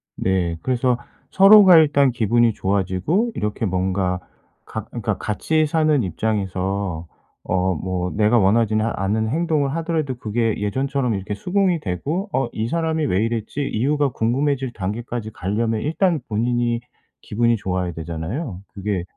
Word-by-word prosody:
네 90 -3 0
그래서 125 -1 +1 0.3
서로가 195 -2 +8
일단 145 -4 +4
기분이 120 0 +2
좋아지고 100 - 0
이렇게 105 +1 -2
뭔가 95 -1 0 0.5
가 - - -6
그니까 - - -3
같이 155 +9 0
사는 155 -3 +2
입장에서 95 -2 -2 0.4
어 95 0 +1
뭐 90 +2 -3
내가 110 +3 +3
원하지는 110 +1 +3
않은 110 +1 -1
행동을 150 0 0
하더라도 160 -5 -1
그게 115 -1 -1
예전처럼 130 +3 -1
이렇게 95 +1 -4
수긍이 180 - 0
되고 150 - -3
'어 135 - 0
이 110 +1 -2
사람이 160 -1 0
왜 100 +1 +1
이랬지?' 115 +5 -3
이유가 140 +5 +1
궁금해질 130 +2 0
단계까지 110 +3 -4
가려면 110 +4 -1
일단 165 - +1
본인이 120 +2 0 0.4
기분이 115 +2 +1
좋아야 90 -3 -2
되잖아요. 85 - -5
그게 100 -2 -3
115 Hz, 325 characters per minute, -21 LUFS, 95-140 Hz, 0.5 s, 서로가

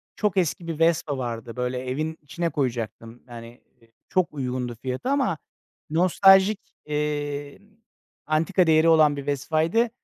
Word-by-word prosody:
çok 205 -3 -1
eski 170 -1 0
bir 165 -1 -4
Vespa 165 -4 +2
vardı. 115 -2 -5
Böyle 125 0 -2
evin 150 +5 -3
içine 170 +4 -3
koyacaktım. 120 -4 -4
Hani, 120 0 -11 0.2
eee, 115 - -25 0.2
çok 185 -4 0
uygundu 125 -3 -3
fiyatı 130 - -3
ama 270 - +1 0.5
nostaljik, 195 +4 +5 0.3
iii, 145 0 -3 0.6
antika 165 +4 +1
değeri 160 +1 +5
olan 155 -3 +5
bir 140 - -6
Vespa'ydı. 160 - +1
150 Hz, 130 wpm, -24 LUFS, 130-170 Hz, 0.6 s, nostaljik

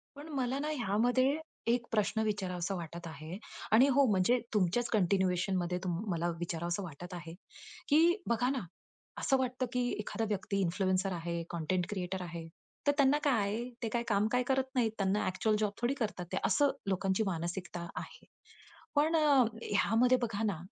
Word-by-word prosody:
पण 290 +2 -9
मला 260 0 0
ना 300 +1 -2
ह्यामध्ये, 245 +3 +2 0.3
एक 235 0 +2
प्रश्न 220 0 +1
विचारावासा 190 -3 -2
वाटत 170 0 -6
आहे. 160 +4 -7 0.3
आणि 245 +6 +7
हो 280 -1 +6
म्हणजे 200 +6 +3
तुमच्याच 210 +4 +2
कंटिन्युएशनमध्ये 185 -2 +1
तुम 175 -2 -1
मला 170 +1 0
विचारावास 170 +1 -2
वाटत 175 0 -7
आहे, 170 -1 -7 0.6
की 330 +5 +5
बघा 240 +2 +2
ना, 270 -2 0 0.6
असं 270 - +3
वाटतं 255 0 -1
की 245 -1 +1
एखादा 225 +2 -2
व्यक्ति 200 0 -1
इन्फ्लुएन्सर 185 +1 +1
आहे, 170 0 -3
कंटेंट 175 +2 -1
क्रिएटर 185 -2 -3
आहे, 170 -2 -6 0.4
तर - - +7
त्यांना 280 +1 +5
काय 275 -5 +3
आहे? 220 +5 -2
ते 225 - 0
काय 235 +2 -1
काम, 210 0 +2
काय 250 0 +2
करत 265 +1 +2
नाहीत 230 -3 +2
त्यांना 195 +1 +1
ॲक्चुअल 215 +4 +1
जॉब 210 -2 +1
थोडी 245 +3 +2
करतात 210 -7 -3
ते? 190 - -1
असं 285 -2 +3 0.2
लोकांची 195 +2 +1
मानसिकता 175 0 -3
आहे. - - -8 0.7
पण 310 +3 +3
अ, - - +5 0.4
ह्यामध्ये 230 +5 +3
बघा 220 -2 -1
ना, 200 -6 0
205 Hz, 165 wpm, -32 LUFS, 180-245 Hz, 0.7 s, आणि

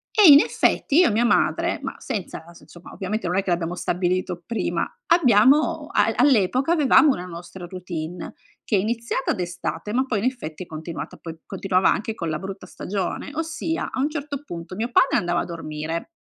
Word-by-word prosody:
E 410 -7 +8
in 285 0 +10
effetti 295 0 +1
io 360 - +6
e - - 0
mia 225 +3 +2
madre, 240 - +2
ma - - -4
senza 205 - -5
adesso, 170 +1 -16
insomma, 175 0 -14
ovviamente 205 +2 -3
non 180 +2 0
è - - +2
che 190 - -10
l'abbiamo 170 0 -1
stabilito 180 0 -1
prima; 235 - -1 0.2
abbiamo 270 - +4
al - - +2
all'epoca 260 - +3
avevamo 300 -2 +5
una 180 - -5
nostra 175 +1 -9
routine 175 -2 -6 0.3
che 210 - 0
è - - +3
iniziata 230 +5 -1
d'estate 175 +1 -4
ma 260 - +2
poi, 250 -5 -1
in 200 - -3
effetti, 185 -11 -4
è - - -24
continuata 160 +1 -7
poi 165 -1 -9
continuava 190 -1 +1
anche 220 +1 -2
con 170 -6 -4
la 155 -1 -2
brutta 195 +2 -7
stagione, 195 +7 -4
ossia, 325 +1 -3
a - - -6
un 290 +3 +1
certo 290 -2 -5
punto, 170 -4 -7
mio 230 +3 -2
padre - - +4
andava 175 -5 0
a - - -2
dormire, 165 - -5
195 Hz, 190 wpm, -23 LUFS, 175-255 Hz, 0.3 s, in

